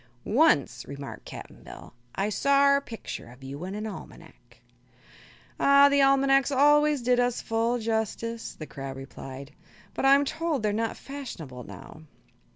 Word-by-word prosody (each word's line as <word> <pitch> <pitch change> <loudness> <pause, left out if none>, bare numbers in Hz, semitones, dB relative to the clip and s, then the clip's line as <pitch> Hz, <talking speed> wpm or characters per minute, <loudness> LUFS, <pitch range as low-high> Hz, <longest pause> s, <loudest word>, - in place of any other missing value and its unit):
"Once," 255 - +2
remarked 140 0 -8
Cap'n - - -10
Bill, - - -12 0.2
"I 195 +2 0
sawr 280 +5 +4
a - - -2
picter 225 - -8
of 125 +2 -16
you 140 +4 -7
in 190 +2 -5
an 210 +1 -4
almanac." 215 - -11 1.0
"Ah; 280 0 +6
the 280 0 +3
almanacs 275 0 +4
always 295 0 +4
did 245 0 +3
us 245 -1 +1
full 230 +2 0
justice," 225 0 -3
the 155 - -8
crab 135 -2 -7
replied, 135 +1 -9 0.4
"but - - -4
I'm 275 +1 +5
told 320 -4 -2
they're 210 -1 +1
not 225 +1 -2
fashionable 165 - -8
now." 155 - -12
230 Hz, 150 wpm, -27 LUFS, -, 1.0 s, Ah